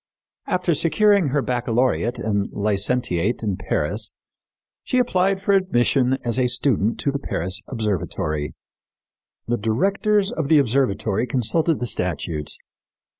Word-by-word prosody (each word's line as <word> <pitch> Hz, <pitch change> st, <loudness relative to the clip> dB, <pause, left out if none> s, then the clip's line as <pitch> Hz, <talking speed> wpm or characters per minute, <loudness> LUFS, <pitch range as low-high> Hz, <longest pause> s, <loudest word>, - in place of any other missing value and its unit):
After 180 Hz, -1 st, +1 dB
securing 200 Hz, +3 st, +3 dB
her 140 Hz, 0 st, 0 dB
baccalaureate 125 Hz, 0 st, 0 dB
and 100 Hz, -2 st, -1 dB
licentiate 105 Hz, 0 st, 0 dB
in 100 Hz, -3 st, -1 dB
Paris, -, -, -2 dB, 0.7 s
she 255 Hz, -, -1 dB
applied 195 Hz, -6 st, +2 dB
for 200 Hz, +1 st, +1 dB
admission 135 Hz, -8 st, +2 dB
as 120 Hz, +2 st, 0 dB
a 125 Hz, -, +3 dB
student 120 Hz, -4 st, +1 dB
to 140 Hz, -, 0 dB
the 140 Hz, -, -3 dB
Paris 95 Hz, -, -2 dB
observatory. 85 Hz, -, -2 dB, 0.9 s
"The 120 Hz, +1 st, 0 dB
directors 195 Hz, -, +1 dB
of 160 Hz, -10 st, -3 dB
the 155 Hz, +1 st, +5 dB
observatory 115 Hz, -4 st, +1 dB
consulted 150 Hz, +6 st, +1 dB
the 125 Hz, -, -2 dB
statutes. 85 Hz, -, -1 dB
125 Hz, 125 wpm, -22 LUFS, 105-165 Hz, 0.9 s, the